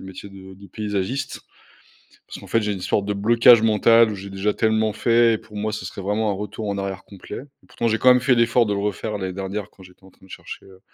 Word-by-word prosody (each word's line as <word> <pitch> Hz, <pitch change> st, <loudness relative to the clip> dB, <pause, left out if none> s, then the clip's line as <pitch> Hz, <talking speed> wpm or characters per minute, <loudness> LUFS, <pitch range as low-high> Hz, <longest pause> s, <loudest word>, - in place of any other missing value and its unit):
le -, -, -10 dB
métier 95 Hz, +1 st, -10 dB
de 95 Hz, -1 st, -12 dB
de 100 Hz, +1 st, -14 dB
paysagiste. 105 Hz, +6 st, -4 dB, 0.9 s
Parce -, -, -8 dB
qu'en -, -, -12 dB
fait 115 Hz, -, +1 dB
j'ai 105 Hz, -, -2 dB
une 95 Hz, -, -5 dB
histoire 100 Hz, +2 st, -1 dB
de 105 Hz, +1 st, -2 dB
blocage 115 Hz, +3 st, +5 dB
mental 115 Hz, +1 st, +4 dB
où -, -, -4 dB
j'ai 100 Hz, 0 st, -9 dB
déjà 100 Hz, +2 st, -1 dB
tellement 110 Hz, -1 st, +1 dB
fait 115 Hz, +1 st, +3 dB
et -, -, -2 dB
pour 110 Hz, -1 st, -15 dB
moi, 105 Hz, +1 st, -2 dB
ce 105 Hz, -4 st, -5 dB
serait 95 Hz, -, -7 dB
vraiment 105 Hz, +2 st, -1 dB
un -, -, 0 dB
retour 105 Hz, +1 st, -6 dB
en 100 Hz, 0 st, -2 dB
arrière 95 Hz, -1 st, -5 dB
complet 100 Hz, -2 st, -10 dB, 0.2 s
et -, -, -24 dB
pourtant 115 Hz, -, -2 dB
j'ai 110 Hz, 0 st, 0 dB
quand 130 Hz, -, +3 dB
même 125 Hz, 0 st, +6 dB
fait 130 Hz, -1 st, +2 dB
l'effort 115 Hz, 0 st, +3 dB
de 105 Hz, -, -1 dB
le 100 Hz, -, -1 dB
refaire 105 Hz, +1 st, -3 dB
l'année 95 Hz, -1 st, -4 dB
dernière 95 Hz, +2 st, -5 dB
quand 95 Hz, -, -19 dB
j'étais 90 Hz, +1 st, -18 dB
en 95 Hz, -, -16 dB
train -, -, -24 dB
de 95 Hz, -, -19 dB
chercher, -, -, -10 dB
heu, 95 Hz, -1 st, -17 dB
105 Hz, 270 wpm, -22 LUFS, 95-110 Hz, 0.9 s, même